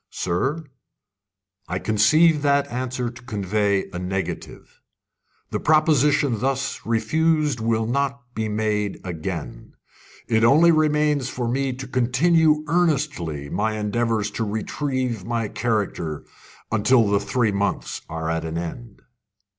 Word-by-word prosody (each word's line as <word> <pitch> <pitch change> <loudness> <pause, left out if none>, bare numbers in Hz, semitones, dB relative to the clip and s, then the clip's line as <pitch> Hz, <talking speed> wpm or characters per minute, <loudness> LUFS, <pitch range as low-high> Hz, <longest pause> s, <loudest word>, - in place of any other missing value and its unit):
"Sir, 135 - -2 1.0
I 90 - -2
conceive 150 - +4
that 140 -1 +2
answer 125 -1 -3
to 120 -1 -13
convey 100 -3 0
a 90 - -4
negative. 95 +1 -5 0.7
The - - -1
proposition 145 -5 +3
thus 135 +2 -1
refused 155 +3 +1
will 115 0 0
not 140 +3 -1
be 110 -2 -2
made 105 -1 -1
again. 85 -5 -6 0.5
It 110 -1 +2
only 155 +8 +6
remains 150 -3 +2
for 120 -2 -3
me 135 +2 0
to 135 +1 -7
continue 150 +5 +3
earnestly 145 - 0
my 110 +1 -1
endeavours 110 0 -1
to 115 - -2
retrieve 120 +1 -2
my 115 0 -2
character 100 -10 -2 0.5
until 110 +1 +4
the 100 0 +2
three 110 +2 0
months 100 0 -2
are 80 0 -4
at 80 0 -1
an 80 0 -4
end." 100 +6 -7
115 Hz, 125 wpm, -23 LUFS, 105-140 Hz, 1.0 s, only